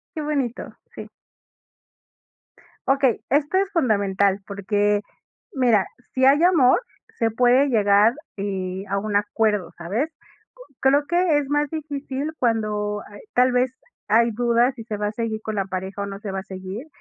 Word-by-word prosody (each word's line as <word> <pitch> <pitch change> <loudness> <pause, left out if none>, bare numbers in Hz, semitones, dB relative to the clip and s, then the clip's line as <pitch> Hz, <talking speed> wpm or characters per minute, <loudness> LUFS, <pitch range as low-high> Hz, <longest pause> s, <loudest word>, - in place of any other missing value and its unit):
Qué 310 - -3
bonito. 280 -5 -3 0.2
Sí. - - -8 1.8
Okey, 270 -3 +3
esto 290 +6 +2
es 390 0 +1
fundamental, 200 - +2
porque, 205 +1 0 0.5
mira, 235 - +3 0.3
si 260 0 0
hay 280 +4 +6
amor, 340 - +5 0.4
se 225 -1 +2
puede 250 +4 +4
llegar, 210 -1 +4 0.2
eh, 190 -1 -3
a 200 - 0
un 205 0 0
acuerdo, 205 -4 0
¿sabes? 210 - -2 0.7
Creo 280 +2 +3
que 345 -2 +2
es 280 -1 -5
más 295 0 +1
difícil 285 -1 -4
cuando 210 -3 0
hay 205 - -12
tal 255 +1 +4
vez, 250 +1 +2 0.4
hay 230 +2 +4
dudas 240 +2 +2
si 225 -3 -9
se 215 - -4
va 210 0 -2
a 210 - -2
seguir 220 -1 -3
con 215 -1 -4
la 195 -1 0
pareja 190 +1 -4
o - - -2
no 195 0 -7
se 205 -2 -5
va 195 - -3
a 190 - -7
seguir, 190 +8 -7
225 Hz, 160 wpm, -23 LUFS, 205-270 Hz, 1.8 s, hay